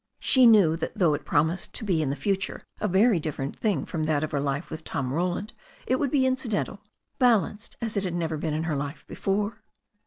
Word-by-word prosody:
She 255 -2 +5
knew 200 -8 +6
that 170 - -5
though 175 -6 +4
it 145 - -4
promised 160 +5 0
to - - -3
be 175 -6 +1
in 145 - 0
the 140 - -1
future 195 +7 -2 0.2
a 210 - 0
very 200 +1 +4
different 145 -3 -4
thing 200 - 0
from 155 -2 -3
that 155 -1 +1
of 155 - -3
her 145 - 0
life 140 +3 -2
with 160 - -6
Tom 130 -1 -3
Roland, 180 +6 -2 0.3
it 255 - +1
would 280 0 0
be 265 -1 +2
incidental, 240 -6 -1 0.4
balanced 225 -3 +2
as 225 -2 -2
it 200 - 0
had 180 -3 -2
never 165 -2 -1
been 150 0 -2
in 155 - -1
her 160 -2 -1
life 145 +2 -5
before. 205 +2 -2
180 Hz, 220 wpm, -26 LUFS, 155-210 Hz, 0.4 s, knew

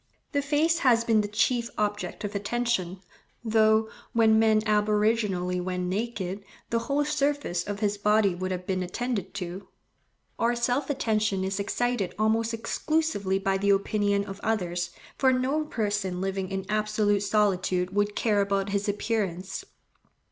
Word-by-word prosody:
The 285 -2 +1
face 305 +4 +2
has 240 -6 +4
been 225 -2 +3
the 205 - -3
chief 235 +3 +1
object 210 0 -2
of 205 0 -3
attention, 200 -3 -1 0.4
though, 220 -1 +3 0.3
when 220 -1 +5
man 220 -1 +4
aboriginally 210 -3 +1
went 180 0 -2
naked, 195 -2 -3 0.3
the 230 - +2
whole 285 +4 0
surface 285 -11 0
of 205 0 -5
his 205 -1 0
body 210 -1 +3
would 185 +1 -3
have 180 -1 -4
been 185 0 -1
attended 200 +1 -3
to. 185 0 -5 0.7
Our 235 +1 +2
self 250 +4 0
attention 215 -7 0
is 190 +1 -2
excited 230 -1 -1
almost 220 +1 +1
exclusively 230 -3 0
by 195 0 0
the 200 +1 +1
opinion 200 0 +2
of 195 -1 -8
others, 175 -5 -1 0.3
for 260 -1 +5
no 265 +5 0
person 205 -8 -2
living 190 0 -2
in 195 -1 -3
absolute 215 -1 +1
solitude 190 -3 +1
would 205 0 +1
care 210 -3 +2
about 200 0 0
his 200 +1 -1
appearance. 200 -3 -2
210 Hz, 150 wpm, -27 LUFS, 195-230 Hz, 0.7 s, when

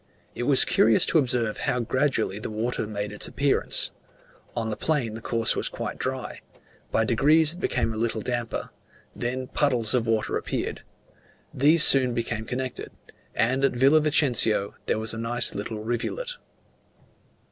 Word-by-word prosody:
It 120 - -4
was 140 -2 +7
curious 110 0 +3
to 160 - +3
observe 120 -5 -1
how 125 - -1
gradually 120 -5 -1
the 110 - -5
water 110 +1 -3
made 105 -1 -5
its 105 - -2
appearance: 140 +1 0 0.6
on 115 -1 -2
the - - -3
plain 140 -7 -1
the 110 - -8
course 115 -1 +1
was - - -2
quite - - -6
dry; - - -4 0.5
by - - +1
degrees 155 +2 +4
it 175 - -11
became 115 -9 -1
a - - -6
little 115 -1 -2
damper; 120 0 -4 0.4
then 130 +2 -3
puddles 125 -5 0
of 120 -2 0
water 110 -1 0
appeared; - - -4 0.7
these 150 +4 +5
soon 130 -3 +6
became 115 -2 -3
connected; 130 +1 -5 0.4
and 130 +4 +1
at 135 - +2
Villa 135 +5 +4
Vicencio 125 -9 +2
there - - 0
was 110 0 -3
a 110 - -6
nice 120 +2 0
little 105 +1 -6
rivulet. 120 - -3
120 Hz, 160 wpm, -25 LUFS, 110-135 Hz, 0.7 s, was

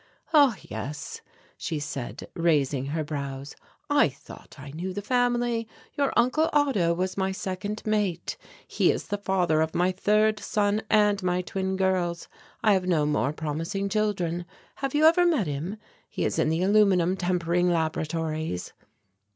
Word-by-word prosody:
"Ah, 285 -7 +6
yes," 135 +7 -6 0.4
she 160 - -3
said, 140 -4 -5
raising 145 -5 +1
her 155 +2 -2
brows. 140 -2 -5 0.3
"I - - +4
thought - - -14
I 140 +1 -9
knew 180 +5 -4
the 205 +2 -5
family. 240 -1 +1 0.3
Your 280 -1 +1
Uncle 255 +7 +3
Otto 270 - +2
was 185 +2 -2
my 190 0 0
second 190 +2 -4
mate. 205 -6 -1 0.3
He - - +2
is - - -5
the 205 -1 -2
father 180 -5 +1
of 160 0 -1
my 180 +2 +2
third 210 +3 +2
son 205 0 0
and 210 -1 +3
my 180 0 0
twin 190 +1 -2
girls. 185 -3 0 0.4
I 215 - +5
have 185 -2 0
no 160 -5 +2
more 150 -2 +1
promising 165 +6 -3
children. 185 -5 -1 0.3
Have 275 0 -3
you 305 +1 +4
ever 335 +3 +6
met 320 - +2
him? 155 +8 -4 0.3
He - - -2
is - - -1
in - - +2
the 165 +3 0
aluminum 190 -3 +4
tempering 180 -1 +1
laboratories." 160 - -2
185 Hz, 155 wpm, -26 LUFS, 160-210 Hz, 0.4 s, Ah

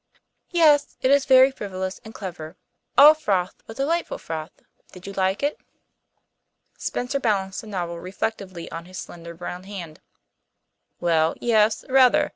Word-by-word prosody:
"Yes. 305 -5 +3
It 260 - +4
is 280 -1 +4
very 260 0 +7
frivolous 190 -6 -5
and 220 - -10
clever 170 -7 -8 0.4
all 295 +2 +10
froth 195 -12 -1
but 225 - -10
delightful 330 +5 -1
froth. 160 0 -7 0.3
Did 180 0 -12
you 200 - -7
like 190 +4 0
it?" 290 +1 0 1.2
Spencer 255 +3 -3
balanced 195 -6 -1
the 220 - -13
novel 175 -4 -4
reflectively 185 -1 -5
on 165 0 -6
his 185 +1 -10
slender 170 0 -9
brown 180 +2 -7
hand. 175 -6 -8 1.0
"Well, 165 -2 +2
yes, 220 -2 +2
rather. 260 -1 +4
195 Hz, 140 wpm, -24 LUFS, 175-260 Hz, 1.2 s, all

